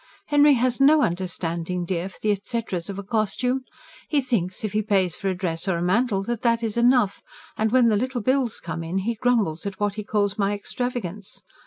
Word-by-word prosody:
"Henry 290 0 +6
has 250 +1 +1
no 295 +2 +6
understanding, 175 0 -2
dear, 180 +1 -2
for - - -16
the 215 - +3
etceteras 200 -3 -3
of 195 - -5
a 200 - -5
costume. 230 +5 0 0.5
He 300 - +2
thinks, 220 -10 -2
if 215 -2 -2
he 215 - +2
pays 195 -5 +1
for 195 - -2
a 185 - -1
dress 175 -1 -2
or 185 -3 +1
a - - -3
mantle, 195 +2 +1
that 235 +2 -3
that 230 -1 +2
is 220 -2 -1
enough; 240 -4 +3 0.3
and 220 0 0
when 250 -1 +5
the 215 -2 +3
LITTLE 255 +2 -2
bills 255 -1 0
come 165 -1 -5
in, 165 +3 -3
he 235 - +1
grumbles 220 -8 0
at 195 -1 -6
what 205 -1 0
he 210 +1 -5
calls 205 0 0
my 200 0 +2
extravagance. 210 -4 -4
210 Hz, 210 wpm, -24 LUFS, 185-245 Hz, 0.5 s, Henry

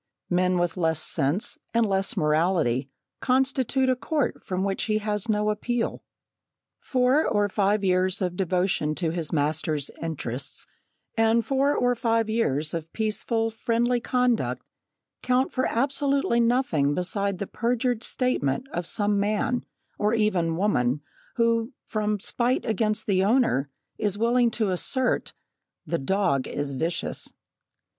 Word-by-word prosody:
Men 180 +1 +2
with 175 0 0
less 160 -3 +1
sense, 155 +5 0 0.2
and 230 -1 +4
less 195 0 0
morality, 150 -5 +1 0.3
constitute 265 0 +1
a 255 - +3
court 290 +2 -2
from 185 0 -2
which 195 -1 -1
he 215 -1 +1
has 210 0 -1
no 210 0 +2
appeal. 230 +2 -2 0.8
Four 255 +4 +2
or 205 0 +2
five 205 +1 +1
years 185 0 +2
of 180 -2 -2
devotion 180 -4 0
to 165 -1 0
his 165 -2 -3
master's 150 -1 -1
interests, 140 -5 -4 0.5
and 225 0 +3
four 275 +1 +2
or 245 0 +2
five 230 -2 0
years 155 - 0
of 165 -1 -5
peaceful, 225 +1 -1
friendly 235 +2 0
conduct, 250 -1 0 0.6
count 255 +1 +1
for 255 - +1
absolutely 275 0 +1
nothing 230 - +2
beside 200 +2 -1
the 200 - -3
perjured 240 +2 -1
statement 250 - 0
of 175 -8 -4
some 205 -1 0
man, 215 +4 0 0.3
or 210 +2 +2
even 180 -7 +1
woman, 145 -9 +1 0.3
who, 230 +1 +1
from 210 -1 -1
spite 245 +5 +1
against 215 -1 0
the 190 -2 +2
owner, 205 - +2 0.3
is 205 -1 0
willing 235 +2 +3
to 215 -3 -1
assert, 250 +8 0 0.5
"the 170 - -1
dog 140 -3 +1
is 145 -1 -3
vicious." 165 +6 -3
210 Hz, 135 wpm, -25 LUFS, 175-235 Hz, 0.8 s, and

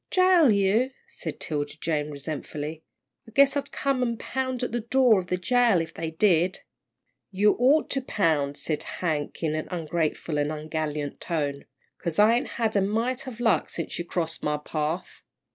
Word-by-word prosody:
"Jail 365 -5 +5
you," 210 +6 +2
said - - -7
'Tilda 145 -1 -3
Jane, 150 -2 -1
resentfully, 150 +1 -5 0.5
"I - - -13
guess 280 +1 +6
I'd 280 -1 -2
come 275 -2 0
and 235 -2 -1
pound 260 -1 -2
at 245 - -2
the 240 - -1
door 235 -2 +4
of 180 - -6
the 180 - 0
jail 240 0 +3
if 165 - -4
they 165 0 -4
did." 175 +1 +2 0.7
"You 205 +2 +3
ought 275 +5 +4
to 270 - +1
pound," 155 - 0
said 155 -2 -2
Hank, 155 -3 -3
in 155 -1 +1
an 155 0 -3
ungrateful 160 -2 -2
and 145 +1 0
ungallant 155 -1 -3
tone, 145 -4 -2 0.3
"'cause 170 -3 -3
I 215 +2 +6
ain't 240 - +1
had 225 -2 0
a 200 - +4
mite 230 +7 -1
of 240 -3 -7
luck 235 -2 +2
since 165 - -4
you - - -1
crossed 165 -2 -2
my 150 0 0
path." 155 +3 -4
180 Hz, 180 wpm, -26 LUFS, 155-240 Hz, 0.7 s, guess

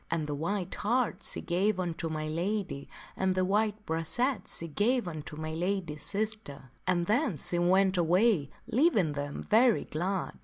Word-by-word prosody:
And 165 -2 0
the 150 - -3
white 175 +5 -2
hart 230 -2 0
she - - -2
gave 185 +3 +1
unto 170 -2 -2
my 155 -1 -3
lady 175 -2 -2 0.3
and 190 -1 +1
the 185 0 +2
white 210 +2 0
brachet 200 - -1
she 170 - -4
gave 220 - +1
unto 155 -2 -6
my 155 +1 -4
lady's 175 -3 -2
sister. 205 - -3 0.2
And 175 -1 +2
then 220 - +1
she 175 +4 0
went 190 +2 +3
away 175 -2 +3 0.2
leaving 220 - +3
them 145 0 -4
very 230 +1 +4
glad. 180 +4 -3
185 Hz, 160 wpm, -30 LUFS, 160-210 Hz, 0.3 s, very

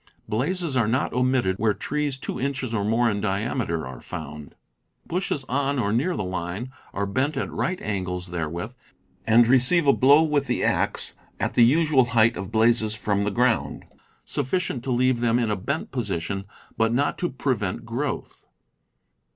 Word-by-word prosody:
Blazes 145 - -1
are 115 -4 +2
not 125 +4 0
omitted 125 -6 +1
where 110 0 +1
trees 150 -2 -2
two - - -5
inches 135 -3 -2
or 105 -3 0
more 115 +3 +2
in 105 -3 0
diameter 100 - -1
are 65 0 -9
found. 75 +1 -8 0.5
Bushes 175 -5 -2
on 140 +1 0
or 105 -4 0
near 160 +10 +1
the - - -2
line 95 +6 -4 0.2
are 100 - -2
bent 130 +10 -1
at - - -2
right 185 +1 -2
angles 90 -3 -3
therewith, 85 +6 -4 0.5
and 115 +1 +6
receive 135 +7 +4
a 140 - +6
blow 140 +4 +6
with 150 -3 +1
the - - 0
axe - - 0 0.3
at - - -1
the 120 - +5
usual 145 +1 +4
height 115 +1 +5
of 95 -1 -6
blazes 110 -1 +2
from 100 -2 0
the - - +1
ground, 120 +2 0 0.4
sufficient 140 -2 -2
to 135 - -1
leave 125 0 +2
them 120 0 +2
in 115 -3 0
a - - +1
bent 140 +11 -3
position, 100 -5 -3 0.3
but 115 0 +3
not 140 +5 0
to 175 - 0
prevent 120 -9 -2
growth. 125 +5 -4
120 Hz, 170 wpm, -24 LUFS, 100-135 Hz, 0.5 s, and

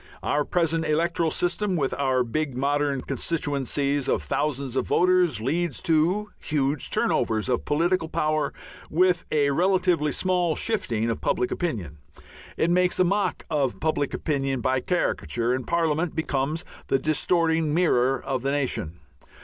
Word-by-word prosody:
Our 145 0 +1
present 165 -2 0
electoral 165 +1 +1
system, 185 +4 -1
with 140 -5 0
our 130 -2 +1
big 135 +2 -2
modern 140 0 0
constituencies 140 -1 -1
of - - +1
thousands 140 -3 -2
of - - 0
voters, 180 -7 +3
leads 160 +6 -1
to 180 +5 +2
huge 145 -1 -1
turnovers 110 -2 0
of 125 -2 -1
political 165 +2 +1
power 155 -2 0 0.4
with 180 +1 +2
a 145 -2 +2
relatively 180 -1 +2
small 180 -2 0
shifting 120 - -1
of 115 - -4
public 125 - 0
opinion. 95 - -3 0.6
It 170 - +2
makes 180 0 +2
a - - +6
mock 200 +3 0
of 140 -5 0
public 155 -3 -1
opinion 135 -3 -1
by 130 +2 +1
caricature, 120 - -1
and 130 -1 -3
Parliament 165 0 0
becomes 155 +1 -1 0.2
the - - +2
distorting 160 +2 +1
mirror 135 -6 +2
of 130 -2 -3
the 135 - -1
nation. 120 - -2
150 Hz, 140 wpm, -25 LUFS, 135-170 Hz, 0.6 s, a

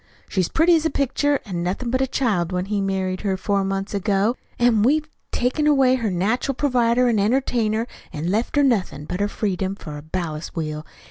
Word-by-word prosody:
She's 185 -4 0
pretty 335 +2 +4
as 320 - +1
a 320 - +2
picture, 285 0 +1
an' 180 -5 -4
nothin' 195 +8 -2
but 260 +1 +1
a 265 - +2
child 210 -10 0
when 180 0 -1
he 205 0 -1
married 190 -1 -1
her 195 -2 -1
four 200 +1 0
months 195 +1 -3
ago, 200 +3 +1 0.2
an' 240 -3 +3
we've 300 +7 +2 0.2
took 250 +5 0
away 275 -4 +4
her 235 -4 0
natural 220 +9 0
pervider 250 -3 +2
an' 230 -3 +2
entertainer, 225 0 +1 0.3
an' 160 +4 -3
left 220 +7 -1
her 290 - +4
nothin' 200 - 0
but 180 - -4
her 205 - +2
freedom 195 -2 -2
for 150 -6 -8
a - - -8
ballast 155 -1 -5
wheel. 155 -1 -4
210 Hz, 200 wpm, -22 LUFS, 185-255 Hz, 0.3 s, pretty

